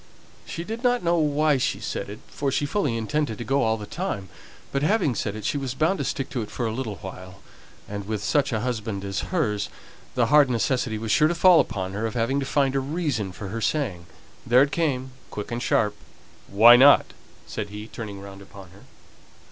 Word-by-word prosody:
She 170 Hz, -, -5 dB
did 225 Hz, +6 st, -6 dB
not 245 Hz, -3 st, +2 dB
know 170 Hz, 0 st, +2 dB
why 150 Hz, -1 st, +2 dB
she 130 Hz, -, -1 dB
said -, -, -4 dB
it, 105 Hz, -, -9 dB
for 140 Hz, -1 st, -2 dB
she 145 Hz, -, 0 dB
fully 145 Hz, -, 0 dB
intended 115 Hz, +1 st, -1 dB
to -, -, -5 dB
go 135 Hz, +3 st, +1 dB
all 110 Hz, 0 st, +1 dB
the 105 Hz, -, -7 dB
time; 100 Hz, -, -4 dB, 0.4 s
but 140 Hz, -, -1 dB
having 155 Hz, -, +2 dB
said 105 Hz, -1 st, -3 dB
it, 110 Hz, -, -7 dB
she 145 Hz, -, 0 dB
was 130 Hz, -2 st, -4 dB
bound 160 Hz, +7 st, +1 dB
to -, -, 0 dB
stick 135 Hz, -, -3 dB
to 125 Hz, -, -2 dB
it 105 Hz, -, -6 dB
for 120 Hz, -, -3 dB
a 110 Hz, -, -1 dB
little 110 Hz, -3 st, -4 dB
while; 95 Hz, 0 st, -9 dB, 0.5 s
and, 100 Hz, -1 st, -6 dB
with 105 Hz, -2 st, -3 dB
such 140 Hz, -2 st, +1 dB
a 110 Hz, -3 st, -1 dB
husband 110 Hz, -5 st, -3 dB
as 95 Hz, -1 st, -2 dB
hers, 105 Hz, -, 0 dB, 0.5 s
the 120 Hz, -, +3 dB
hard 145 Hz, -3 st, +7 dB
necessity 125 Hz, -1 st, 0 dB
was 110 Hz, 0 st, -3 dB
sure 155 Hz, -, +5 dB
to 175 Hz, -, -1 dB
fall 175 Hz, 0 st, +6 dB
upon 95 Hz, -5 st, -1 dB
her 110 Hz, +3 st, -1 dB
of 110 Hz, -, -7 dB
having 120 Hz, +4 st, +1 dB
to 135 Hz, -, -3 dB
find 140 Hz, -2 st, +1 dB
a -, -, +3 dB
reason 135 Hz, -, -2 dB
for 100 Hz, +2 st, -7 dB
her 115 Hz, +3 st, -4 dB
saying. 105 Hz, -, -1 dB, 0.4 s
Then 125 Hz, +3 st, +5 dB
it 140 Hz, -, -1 dB
came, 135 Hz, -6 st, -1 dB, 0.2 s
quick 105 Hz, +2 st, -6 dB
and 120 Hz, +1 st, -3 dB
sharp. 105 Hz, -4 st, +1 dB, 0.5 s
"Why 115 Hz, +5 st, +8 dB
not?" 140 Hz, +3 st, +6 dB, 0.3 s
said 105 Hz, -, -5 dB
he, 105 Hz, +1 st, -7 dB
turning 110 Hz, -3 st, -7 dB
round 100 Hz, 0 st, -10 dB
upon 95 Hz, -2 st, -13 dB
her. 95 Hz, -, -17 dB
120 Hz, 220 wpm, -25 LUFS, 105-145 Hz, 0.5 s, Why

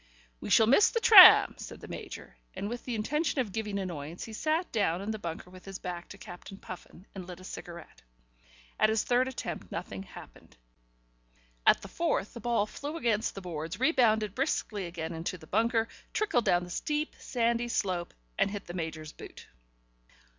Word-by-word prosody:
"We -, -, -7 dB
shall 220 Hz, -, +6 dB
miss 270 Hz, -, +5 dB
the 465 Hz, -, -1 dB
tram," 410 Hz, -5 st, +10 dB
said -, -, -8 dB
the -, -, -10 dB
Major, -, -, -8 dB, 0.2 s
and, 195 Hz, +2 st, -4 dB
with 240 Hz, +2 st, -6 dB
the 245 Hz, -, -3 dB
intention 285 Hz, +8 st, -1 dB
of 235 Hz, -6 st, -1 dB
giving 210 Hz, -1 st, -3 dB
annoyance, 170 Hz, -4 st, -5 dB
he 225 Hz, -, -8 dB
sat 315 Hz, +9 st, -1 dB
down 195 Hz, -6 st, +1 dB
in 200 Hz, +3 st, -3 dB
the 215 Hz, -, -4 dB
bunker 170 Hz, -1 st, -6 dB
with 185 Hz, 0 st, -13 dB
his 195 Hz, -1 st, -6 dB
back 175 Hz, -2 st, -6 dB
to 200 Hz, -, -10 dB
Captain 185 Hz, +1 st, -10 dB
Puffin, 185 Hz, -1 st, -11 dB
and 185 Hz, -2 st, -8 dB
lit 180 Hz, -1 st, -9 dB
a -, -, -13 dB
cigarette. 170 Hz, -2 st, -10 dB, 0.8 s
At 215 Hz, -, +5 dB
his 220 Hz, 0 st, +1 dB
third 250 Hz, +1 st, +2 dB
attempt 260 Hz, -, -6 dB
nothing -, -, -5 dB
happened; 190 Hz, -, -14 dB, 1.1 s
at -, -, +5 dB
the -, -, -7 dB
fourth 215 Hz, -, -1 dB
the 235 Hz, -, -8 dB
ball 235 Hz, -4 st, +1 dB
flew 290 Hz, +8 st, -6 dB
against 225 Hz, -7 st, 0 dB
the 195 Hz, -, -6 dB
boards, 165 Hz, +2 st, -5 dB
rebounded 220 Hz, -, +3 dB
briskly 215 Hz, -, -2 dB
again 165 Hz, -1 st, -5 dB
into 165 Hz, +3 st, -4 dB
the 160 Hz, -, -14 dB
bunker, 225 Hz, +5 st, +1 dB, 0.3 s
trickled 410 Hz, -, +1 dB
down 175 Hz, 0 st, +3 dB
the 175 Hz, -, -9 dB
steep, 300 Hz, -, -2 dB
sandy 235 Hz, -1 st, 0 dB
slope 185 Hz, -6 st, -2 dB, 0.2 s
and -, -, +3 dB
hit 200 Hz, -1 st, -6 dB
the 175 Hz, -, -8 dB
Major's 160 Hz, -3 st, -5 dB
boot. -, -, -12 dB
205 Hz, 185 wpm, -30 LUFS, 180-240 Hz, 1.1 s, tram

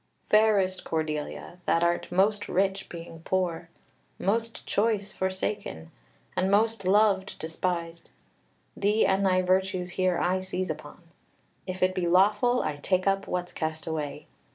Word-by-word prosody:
"Fairest 205 Hz, -3 st, +4 dB
Cordelia, 155 Hz, +2 st, -3 dB
that 165 Hz, -, +3 dB
art 170 Hz, +1 st, 0 dB
most 205 Hz, +3 st, +2 dB
rich, 195 Hz, +1 st, 0 dB
being 165 Hz, -1 st, -9 dB
poor; 175 Hz, -2 st, -1 dB, 0.5 s
most 230 Hz, +4 st, -1 dB
choice, 205 Hz, -1 st, 0 dB
forsaken; 190 Hz, -, -3 dB, 0.4 s
and 185 Hz, -, +1 dB
most 220 Hz, +1 st, +2 dB
loved, 195 Hz, 0 st, +3 dB
despised! 170 Hz, +1 st, -3 dB, 0.7 s
Thee 210 Hz, +2 st, +2 dB
and 195 Hz, 0 st, +2 dB
thy 185 Hz, -1 st, +3 dB
virtues 185 Hz, -1 st, +1 dB
here 185 Hz, -1 st, +1 dB
I 185 Hz, +1 st, +1 dB
seize 185 Hz, -2 st, -3 dB
upon; 155 Hz, +3 st, -9 dB, 0.6 s
if 185 Hz, 0 st, -2 dB
it 185 Hz, 0 st, +3 dB
be 185 Hz, -2 st, -1 dB
lawful, 210 Hz, +8 st, +4 dB
I 150 Hz, -, -2 dB
take 185 Hz, +5 st, 0 dB
up 195 Hz, 0 st, +1 dB
what's 180 Hz, 0 st, -3 dB
cast 160 Hz, 0 st, -3 dB
away. 155 Hz, -3 st, -4 dB
185 Hz, 135 wpm, -27 LUFS, 170-195 Hz, 0.7 s, Fairest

